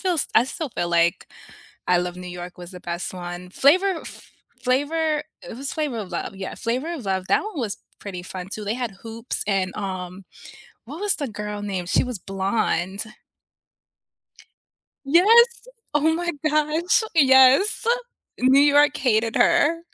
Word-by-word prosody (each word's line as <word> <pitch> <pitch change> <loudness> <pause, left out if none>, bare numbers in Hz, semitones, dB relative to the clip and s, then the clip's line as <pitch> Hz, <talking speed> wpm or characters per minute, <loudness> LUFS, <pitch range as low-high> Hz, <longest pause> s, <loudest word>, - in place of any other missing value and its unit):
feel 370 -2 0
s 310 - -1
I 225 - +6
still 290 +4 -5
feel 175 -7 -3
like 170 0 +1 0.6
I 180 -1 +4
Love 180 0 -3
New 180 0 -8
York 175 0 -8
was 175 0 -10
the 180 - -10
best 175 +2 -4
one. 175 0 -7
Flavor 355 - +3
Fl - - -10 0.4
Flavor 300 +4 0 0.2
it - - -9
was 275 +1 -5
Flavor 295 -7 -2
of 195 -4 -6
Love, 180 - -4
yeah, 190 0 -6
Flavor 255 +9 -2
of 290 -9 -6
Love, 190 -1 -2
that - - +2
one 425 -6 -7
was 225 -6 -3 0.2
pretty 185 -3 -7
fun, 185 0 -7
too. 215 - -5
They 205 +2 -1
had 245 -4 -3
Hoops, 230 +2 -4
and, 195 -2 0
um, 185 -2 -5 0.6
what 290 +8 -8
was 410 0 +2
the 285 - -4
girl 210 -1 -6
name? 195 -3 -3
She 175 - +2
was 250 -4 -5
blonde. 195 0 -1 2.0
Yes! 455 - +5 0.3
Oh 310 +2 +3
my 345 +1 -1 0.2
gosh, 305 +6 +2
yes. 270 +8 +5 0.5
New 260 +2 +5
York 290 0 +5
hated 225 -4 +1
her. 330 +3 +3
230 Hz, 165 wpm, -23 LUFS, 190-300 Hz, 2.0 s, I